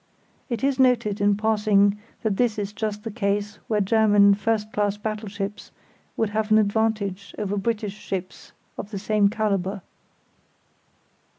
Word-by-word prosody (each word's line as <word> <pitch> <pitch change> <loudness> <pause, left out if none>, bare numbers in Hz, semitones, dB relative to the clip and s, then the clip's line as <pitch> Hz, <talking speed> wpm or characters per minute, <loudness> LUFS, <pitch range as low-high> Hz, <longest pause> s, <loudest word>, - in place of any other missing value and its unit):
It 235 -2 -3
is 275 -1 +1
noted 235 -6 +2
in 205 0 +3
passing 210 -2 +2 0.2
that 210 -4 0
this 240 -4 +1
is 205 0 -3
just 210 -1 -3
the 225 - -5
case 205 -1 -2
where 215 -2 +1
German 205 -1 +5
first 215 +1 -1
class 205 -1 0
battleships 210 -1 -5 0.5
would 220 -2 0
have 215 0 -1
an 215 - +6
advantage 205 -2 0
over 205 -1 -2
British 210 0 -2
ships 185 -3 -6 0.3
of 205 - -6
the 210 - -5
same 210 0 +2
calibre. 200 -3 -1
210 Hz, 140 wpm, -24 LUFS, 200-220 Hz, 0.5 s, an